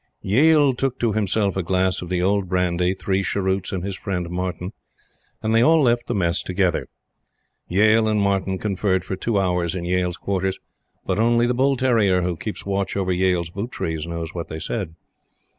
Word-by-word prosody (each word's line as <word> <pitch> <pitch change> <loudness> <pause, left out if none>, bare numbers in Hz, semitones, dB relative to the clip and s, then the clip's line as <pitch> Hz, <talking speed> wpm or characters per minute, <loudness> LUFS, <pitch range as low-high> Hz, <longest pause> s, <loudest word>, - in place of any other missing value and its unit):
Yale 145 +6 +4
took 130 0 -2
to 115 -3 0
himself 100 -1 0
a 95 - 0
glass 95 +1 0
of 90 - -7
the 90 -1 0
old 100 -1 +1
brandy, 90 0 +1
three 95 0 -1
cheroots, 95 0 -1
and 95 -2 -3
his 100 0 -3
friend, 90 -3 -4
Martyn; 90 +1 -4 0.7
and 110 +1 0
they 115 - +5
all 160 +6 +5
left 120 -4 +2
the - - -1
Mess 85 -2 +1
together. 90 -1 0 0.8
Yale 110 +4 +4
and 105 -1 +1
Martyn 95 -1 0
conferred 95 -2 -1
for 95 - -3
two 105 +2 0
hours 90 -2 0
in 85 -2 -4
Yale's 90 0 0
quarters; 95 -1 -1 0.5
but - - -1
only 120 +1 +3
the 120 - +1
bull 135 +2 +2
terrier 110 -8 +2
who 90 0 -1
keeps 105 +5 -6
watch 100 0 -1
over 95 -1 0
Yale's 90 -2 +1
boot 100 +7 -5
trees 80 -1 -3
knows 85 -1 -5
what 85 -2 -5
they 80 - -6
said. 85 -1 -4
95 Hz, 190 wpm, -22 LUFS, 90-110 Hz, 0.8 s, they